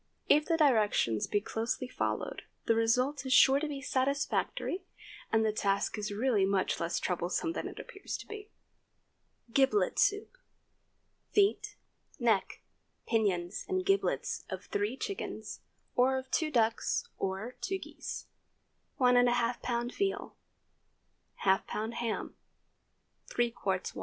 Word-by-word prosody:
If 300 +1 +5
the 330 - +1
directions 215 - +3
be 205 - +1
closely 230 +4 -2
followed, - - -2 0.2
the 230 - +4
result 250 +5 +2
is 260 -1 0
sure 270 +2 +7
to 310 - -2
be 280 -2 -5
satisfactory, 280 +7 0 0.5
and 220 0 +3
the 215 - +2
task 200 -1 0
is 210 -1 -3
really 215 -1 +2
much 190 -1 +1
less 170 +1 -1
troublesome 180 - -1
than - - -3
it - - -9
appears 395 - -6
to - - -10
be. 425 0 -9 1.0
GIBLET 275 +10 +3
SOUP. 415 +4 +2 0.9
Feet, 405 0 +2 0.4
neck, - - +1 0.4
pinions, 195 -5 0
and 370 -1 0
giblets 390 0 +1
of - - -6
three 210 +6 -1
chickens, 395 +7 -5 0.4
or 260 +2 +4
of 260 0 -6
two 315 - +1
ducks 230 -5 +1
or 195 +6 -3
two 385 - -1
geese. - - -7 0.7
1½ 245 -1 +3
lb. 240 0 -1
veal. 395 -1 -2 1.1
½ 190 0 +3
lb. 220 +2 -3
ham. 235 -1 -3 0.9
3 240 -1 0
qts. 190 -4 -2
245 Hz, 125 wpm, -31 LUFS, 210-285 Hz, 1.1 s, sure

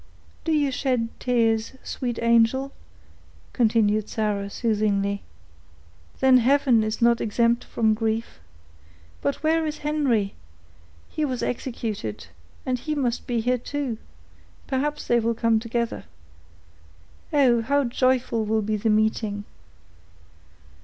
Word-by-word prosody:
"Do 325 - 0
you 290 -3 +2
shed 250 -3 0
tears, 225 -2 +1
sweet 245 -3 -4
angel?" 235 +4 +3 0.8
continued 215 -3 +2
Sarah, 205 -2 -1
soothingly. 200 -3 0 1.0
"Then 260 -1 +6
heaven 255 -2 +3
is 215 +2 -2
not 235 0 +4
exempt 235 +2 +1
from 220 -2 +1
grief. 225 - -2 0.8
But 140 - -2
where 320 +1 +2
is 305 0 -4
Henry? 260 -10 +1 0.7
He 310 - -3
was 260 -4 -2
executed, 220 - -4 0.4
and 255 -1 -1
he 305 +4 -3
must 250 -4 -1
be 240 -2 0
here 250 +2 +1
too; 260 -3 -4 0.7
perhaps 290 +2 -2
they 240 - +3
will 230 0 0
come 230 -1 +2
together. 235 +1 -3 1.3
Oh! 260 -6 +4
how 280 +5 +1
joyful 250 -2 +1
will 215 0 0
be 215 +1 -1
the 220 +2 0
meeting!" 215 -1 +1
235 Hz, 120 wpm, -24 LUFS, 220-260 Hz, 1.3 s, Then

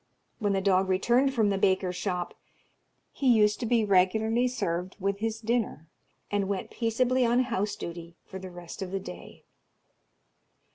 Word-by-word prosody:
When 205 -3 +1
the 195 - +1
dog 190 -1 +2
returned 240 +8 +3
from 215 -4 +3
the 195 - 0
baker's 185 -1 +1
shop, 180 -1 -3 0.8
he 265 -3 +2
used 210 -2 +4
to 235 - -2
be 230 -2 +3
regularly 220 +5 +3
served 180 -7 -3
with 200 +1 -1
his 225 0 -2
dinner, 225 -8 -1 0.5
and 205 -1 0
went 195 -1 -3
peaceably 250 +2 +1
on 240 +1 +3
house 210 -4 -1
duty 170 -3 -8
for 190 - -8
the 190 0 -8
rest 175 +2 -10
of 190 - -3
the 195 +1 -2
day. 190 - -10
200 Hz, 160 wpm, -28 LUFS, 185-230 Hz, 0.8 s, used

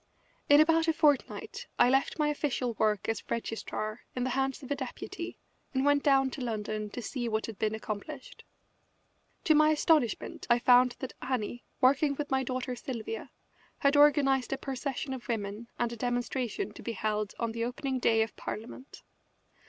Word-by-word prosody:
In 290 0 +8
about 325 +1 +4
a 325 - +4
fortnight 295 -3 +1
I - - +6
left 270 +2 +2
my 300 -1 +2
official 275 -5 -1
work 215 -2 +1
as 225 -2 -1
registrar 225 -1 -3
in 250 - -1
the 260 - -1
hands 270 +1 -1
of 260 - -9
a - - +2
deputy 265 -2 -6 0.4
and 265 +1 +2
went 285 0 +4
down 270 -2 +3
to 270 - -6
London 215 -2 -3
to 240 +3 -6
see 240 0 -3
what 220 0 -1
had 220 -4 -8
been 215 0 0
accomplished. 215 - -7 1.0
To 315 - +5
my 305 0 +6
astonishment 310 -5 +1
I 240 - +6
found 245 0 +5
that 260 - -5
Annie, 245 -2 -3 0.2
working 280 +2 +4
with 290 0 -4
my 265 0 +3
daughter 255 -1 -3
Sylvia, 245 - -5 0.5
had 280 +1 +3
organised 280 -3 +4
a 270 - 0
procession 270 0 -4
of 260 -1 -7
women 215 -1 -3
and 235 -1 -1
a - - -5
demonstration 245 -3 -2
to - - -11
be 230 - -4
held 215 -1 -2
on 230 -1 -1
the 230 0 -3
opening 260 +2 -2
day 225 -2 +4
of 220 - -7
Parliament. 235 +4 -8
255 Hz, 175 wpm, -30 LUFS, 225-280 Hz, 1.0 s, In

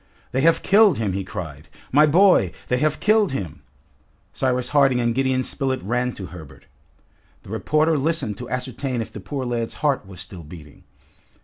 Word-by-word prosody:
"They 130 - 0
have 165 +3 +3
killed 205 0 +5
him!" 105 -4 -1
he 95 +1 -2
cried. 80 -6 -8 0.2
"My 150 +3 +6
boy! 170 - +4 0.2
They 125 - +2
have 155 +1 0
killed 210 -5 +3
him!" 80 - -5 0.7
Cyrus 125 -1 -1
Harding 135 -4 +3
and 120 -1 +1
Gideon 130 0 +1
Spilett 130 -3 -2
ran 125 +5 -1
to 95 - -8
Herbert. 75 -7 -12 0.8
The - - -12
reporter 155 +7 +1
listened 140 -7 -1
to 125 - -7
ascertain 125 0 -3
if - - -12
the - - -7
poor 135 +6 -5
lad's 120 -2 -3
heart 135 -9 +1
was 95 -3 -11
still 95 -1 -8
beating. 75 -1 -13
125 Hz, 175 wpm, -22 LUFS, 100-145 Hz, 0.8 s, My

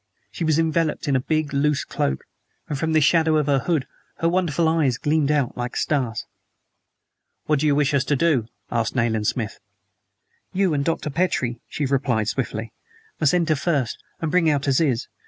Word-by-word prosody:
She - - -4
was 155 -2 +2
enveloped 160 -1 0
in 140 - +2
a - - +3
big, 155 +1 -1
loose 145 +1 +1
cloak, 65 - -2 0.4
and 150 - -3
from 160 +3 -1
the 155 - +4
shadow 160 +1 +4
of 150 - +1
the 140 -1 +2
hood 155 -3 0 0.3
her 165 - +1
wonderful 170 -2 +1
eyes 155 -6 +2
gleamed 150 +1 +1
out 145 -5 +1
like 120 0 -4
stars. 130 -7 -1 1.2
"What 150 -2 +2
do 155 - +1
you 145 - +3
wish 145 0 +2
us 140 -2 +3
to 145 - +1
do?" 140 -6 +2 0.2
asked 115 0 -1
Nayland 110 -3 +1
Smith. 115 -4 -2 0.9
"You 190 -3 +2
and 140 -1 0
Dr. 155 -1 -1
Petrie," 130 -8 0
she 145 - -3
replied 130 -5 0
swiftly, 115 -2 -3 0.5
"must 155 +2 +3
enter 165 -3 +2
first, 140 -4 -1 0.2
and 160 -2 -1
bring 175 -2 +3
out 145 -2 0
Aziz. 135 -3 +1
145 Hz, 180 wpm, -23 LUFS, 130-160 Hz, 1.2 s, the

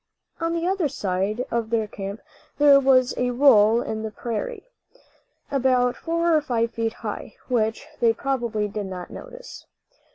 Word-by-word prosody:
On 330 0 -1
the 335 0 -1
other 375 -3 +1
side 205 -2 -2
of 230 -1 -1
their 225 -1 +1
camp 200 0 -7 0.4
there 285 -1 +7
was 260 -2 +4
a 250 0 +1
roll 240 -3 +5
in 220 0 -4
the 220 - -3
prairie, 240 - -5 0.9
about 255 -2 +2
four 335 0 +1
or 305 - +3
five 235 -5 -1
feet 225 0 -2
high, - - -5
which 220 0 0
they 230 -1 +4
probably 235 -4 -2
did 205 -1 -5
not 180 -2 -7
notice. - - -11
240 Hz, 155 wpm, -24 LUFS, 220-280 Hz, 0.9 s, there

